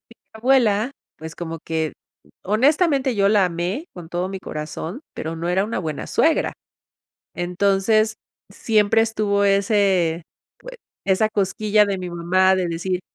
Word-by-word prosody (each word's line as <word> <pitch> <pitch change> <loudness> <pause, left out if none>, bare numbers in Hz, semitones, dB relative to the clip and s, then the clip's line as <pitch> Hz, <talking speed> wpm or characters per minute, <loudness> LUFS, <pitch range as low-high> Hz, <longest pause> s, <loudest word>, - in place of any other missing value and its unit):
Mi 230 - -21 0.2
abuela, 230 -1 +2 0.3
pues, 160 +1 -9
como 165 -1 -6
que 160 -1 -2 0.5
honestamente, 270 - +2
yo 200 -1 +3
la 205 -2 +4
amé 180 - -3
con 175 -3 -10
todo 175 +2 -2
mi 195 - -5
corazón, 160 - -6
pero, 160 +1 -5
no 170 +1 -3
era 185 +2 +2
una 220 -1 -3
buena 155 -5 -4
suegra. 320 0 +2 0.8
Entonces, 200 +5 +1 0.3
siempre 220 0 +2
estuvo 210 -2 0
ese 195 -4 +2 0.4
pues, - - -10 0.3
esa 200 +3 +2
cosquilla 210 +1 +2
de 200 -1 -2
mi 180 -1 -5
mamá 185 +2 +2
de 185 -2 -1
decir, 175 +2 -2
195 Hz, 140 wpm, -22 LUFS, 175-220 Hz, 0.8 s, la